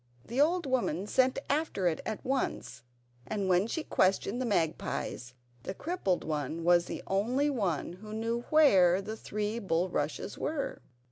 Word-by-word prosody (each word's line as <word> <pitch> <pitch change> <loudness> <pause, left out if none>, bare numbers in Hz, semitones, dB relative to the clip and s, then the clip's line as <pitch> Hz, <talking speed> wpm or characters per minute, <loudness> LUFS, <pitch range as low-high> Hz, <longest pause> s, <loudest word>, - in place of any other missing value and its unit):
The 250 +4 0
old 340 +3 +3
woman 240 - 0
sent 255 +4 +2
after 290 - 0
it 160 - 0
at 220 - -4
once, 255 - -2 0.5
and 205 -3 -2
when 185 +3 +3
she 320 +6 -3
questioned 195 +4 +1
the 255 - -1
magpies 160 - -2 0.3
the 190 - -5
crippled 305 - -1
one 155 +1 -3
was 175 0 +4
the - - -6
only 245 +9 +1
one 185 - -1
who 210 +4 -11
knew 230 +2 -2
where 195 - +6
the 215 +3 -5
three 215 +1 -3
bulrushes 170 -3 -1
were. 295 -2 -3
210 Hz, 150 wpm, -30 LUFS, 175-260 Hz, 0.5 s, where